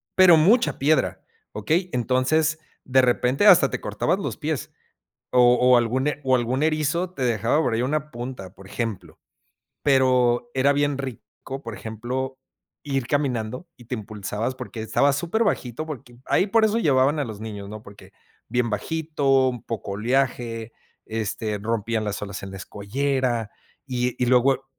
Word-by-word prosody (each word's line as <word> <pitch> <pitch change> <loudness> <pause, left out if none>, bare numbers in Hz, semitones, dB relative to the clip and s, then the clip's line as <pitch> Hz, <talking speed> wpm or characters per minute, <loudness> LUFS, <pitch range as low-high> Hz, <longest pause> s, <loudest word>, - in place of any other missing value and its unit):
pero 180 -3 +7
mucha 220 +10 +3
piedra, 150 +3 +1 0.3
¿okey? 165 - -1
Entonces, 130 +6 +1 0.3
de 130 0 +3
repente 125 +7 +2
hasta 195 -4 +7
te - - -3
cortabas - - -1
los - - -4
pies - - -3 0.6
o 125 -1 +6
o 125 0 +6
algún 125 +4 +1
e 145 -1 -1
o 130 -1 +3
algún 125 +4 0
erizo 160 +3 0
te 135 - -8
dejaba 115 +5 +2
por 120 -7 0
ahí 115 - 0
una 150 +3 -1
punta, 120 -6 -7
por 95 - -14
ejemplo, 115 -2 -5 0.6
Pero 125 -3 +3
era 140 +2 +3
bien 145 -1 +1
rico, 135 0 -7
por 115 -6 -7
ejemplo, 125 +5 -5 0.4
ir 135 -3 -2
caminando 130 +1 -1
y 120 - -15
te 125 - -6
impulsabas 110 +2 -4
porque 125 -3 -7
estaba 140 +6 +2
súper 175 +10 0
bajito, 155 - -2
porque 120 -5 -9
ahí 190 - +2
por 220 +2 +4
eso 220 +2 +1
llevaban 140 -3 +3
a 145 - 0
los 110 -3 -8
niños, 105 -2 -7
¿no? 110 +1 -9
Porque 100 0 -14 0.4
bien 125 0 0
bajito, 135 +2 +1
un 125 -2 -6
poco 105 -3 -5
oleaje, 115 0 -1 0.3
este, 110 -1 -3
rompían 110 +1 -2
las 105 0 -3
olas 100 -1 -6
en 95 - -7
la 95 - -7
escollera 120 +3 -2 0.3
y 125 -1 -1
y - - +3
luego 130 +2 +3
125 Hz, 160 wpm, -24 LUFS, 115-145 Hz, 0.6 s, pero